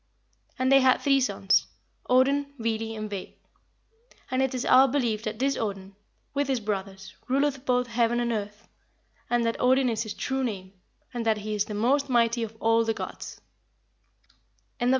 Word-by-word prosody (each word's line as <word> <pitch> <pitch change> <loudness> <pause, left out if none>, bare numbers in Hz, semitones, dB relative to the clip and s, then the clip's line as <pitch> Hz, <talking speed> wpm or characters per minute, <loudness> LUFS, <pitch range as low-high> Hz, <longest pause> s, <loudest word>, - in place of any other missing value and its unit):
And 260 +1 +1
they 275 - +8
had 260 -1 +4
three 275 -2 +3
sons, 200 -4 +2 0.4
Odin, 280 +3 +2
Vili, 225 -1 -2
and 215 0 -4
Ve; 200 -3 -7 0.9
and 255 +1 +1
it 265 0 0
is 250 - -2
our 260 +1 +6
belief 240 -5 0
that 215 -1 -4
this 275 +3 +1
Odin, 195 -3 -4 0.4
with 285 -1 0
his 265 -3 0
brothers, 195 -2 -5
ruleth 275 +1 0
both 250 0 +2
heaven 235 0 +1
and 240 0 0
earth, 210 -1 -5 0.6
and 240 -1 +1
that 230 - -1
Odin 255 +1 +3
is 220 -2 -1
his 215 -2 -5
true 265 0 -2
name, 195 -5 -4 0.4
and 240 -1 -3
that 220 -1 +3
he 215 +1 -5
is 210 -1 0
the 210 - -6
most 270 +6 +1
mighty 235 -1 +2
of 225 -1 -5
all 225 0 +3
the 225 -1 -1
gods." - - -7
235 Hz, 170 wpm, -26 LUFS, 215-260 Hz, 0.9 s, they